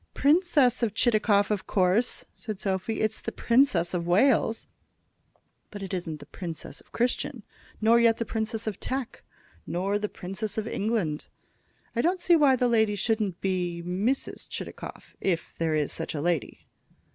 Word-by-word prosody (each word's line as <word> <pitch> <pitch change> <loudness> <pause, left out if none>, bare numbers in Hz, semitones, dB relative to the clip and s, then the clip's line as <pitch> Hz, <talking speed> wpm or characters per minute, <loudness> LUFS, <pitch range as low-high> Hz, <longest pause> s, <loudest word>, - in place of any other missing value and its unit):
"Princess 290 -5 +3
of 225 -3 0
Chitakov, 215 -3 +3
of 205 -3 -2
course," 195 +5 +2
said 215 -5 -6
Sophy. 195 +2 -1
"It's 220 0 0
the - - -4
Princess 235 -8 +2
of 170 -1 -2
Wales." 225 +4 +3 1.0
"But 205 -1 -7
it 195 - -6
isn't 165 -4 -3
the - - -11
Princess 170 -4 -7
of - - -26
Christian, 240 0 -1 0.4
nor 225 +2 +5
yet 230 -1 +4
the 230 - -2
Princess 220 0 -2
of 215 -3 -3
Teck, 260 -2 -4 0.5
nor 195 +4 0
the 210 0 -2
Princess 195 +4 -5
of 220 0 -1
England. 200 -9 -1 0.7
I 235 - +2
don't 360 +5 +1
see 345 0 +4
why 285 -5 +5
the 250 0 +2
lady 220 -3 +3
shouldn't 205 -3 -1
be 180 -3 -1
Mrs. 200 +10 -1
Chitakov, - - -7
if 175 -3 -1
there 160 -1 +1
is 150 -2 0
such 165 - -3
a 145 - -2
lady." 170 -2 -1
215 Hz, 160 wpm, -27 LUFS, 180-235 Hz, 1.0 s, nor